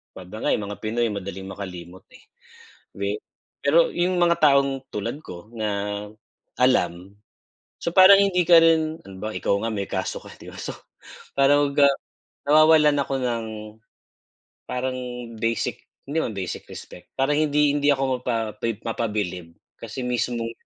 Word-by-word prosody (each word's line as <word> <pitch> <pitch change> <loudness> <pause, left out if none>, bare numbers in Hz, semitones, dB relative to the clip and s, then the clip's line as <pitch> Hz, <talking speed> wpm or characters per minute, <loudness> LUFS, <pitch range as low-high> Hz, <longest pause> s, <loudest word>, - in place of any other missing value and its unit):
'pag 95 -1 -10
nga 110 - -3
mga 105 -1 -3
Pinoy 115 +2 0
madaling 95 -1 -6
makalimot, 95 -2 -8
eh, 255 - -17 0.7
di - - -2 0.4
pero - - +4
yung 180 +1 0
mga 170 -1 +3
taong 140 -2 +3
tulad 115 +6 -4
ko 90 +4 -10
na 110 -2 -3 0.9
alam, 90 -7 +1 0.7
so - - -2
parang 195 +1 +9
hindi 180 -3 +2
ka 165 0 +7
rin 160 -1 +2
halimbawa 100 +3 -6
ikaw - - 0
nga 115 - -1
may 100 -1 -3
kaso - - -3
ka - - -12
'di - - -11
ba - - -11
so, - - -5 0.6
parang 140 +1 +4
ga 145 -1 +7 0.6
nawawalan 155 -1 +5
ako 135 -1 -1
ng, 115 -2 -1 1.2
parang 130 0 -2 0.4
basic, 115 +1 -1 0.3
hindi 145 +4 -1
naman 110 - -4
basic 95 -2 -5
respect, - - -11
parang 140 +2 +2
hindi 150 -1 +3
hindi 145 0 +2
ako 130 -2 0
mapa 115 -3 -1 0.3
mapabilib 105 -7 -3 0.3
kasi 115 +3 -6
mismong 120 -1 -2
125 Hz, 140 wpm, -24 LUFS, 105-150 Hz, 1.2 s, parang